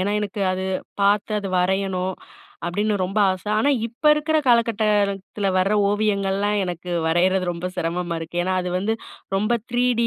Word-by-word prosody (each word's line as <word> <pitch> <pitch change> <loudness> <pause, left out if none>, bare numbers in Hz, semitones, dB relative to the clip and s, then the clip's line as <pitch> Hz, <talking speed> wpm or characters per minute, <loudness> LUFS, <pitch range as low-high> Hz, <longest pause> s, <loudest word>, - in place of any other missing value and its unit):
ஏனா, 200 +2 0
எனக்கு 205 0 -4
அது 185 0 -3 0.4
பார்த்து 205 +2 +2
அது 195 - -4
வரையணும் 190 0 0 0.5
அப்டின்னு 205 +4 0
ரொம்ப 195 +4 -1
ஆசை. 185 +2 -5
ஆனா 285 +6 +3 0.2
இப்ப 235 +6 -18
இருக்குற 305 +1 0
காலகட்டத்தில 210 -4 +1
வர 190 +3 +2 0.2
ஓவியங்கள்லாம் 205 -1 +1
எனக்கு 180 0 -5 0.2
வரையறது 185 +3 +2
ரொம்ப 175 +1 -4
சிரமமா 175 0 -2
இருக்கு. 165 +2 -7
ஏனா 185 +1 -1
அது 180 - -3
வந்து 210 +4 0 0.4
ரொம்ப 210 +3 0 0.2
3டி 245 0 +1
த்ரீடி 230 0 +1
195 Hz, 155 wpm, -22 LUFS, 185-210 Hz, 0.5 s, ஆனா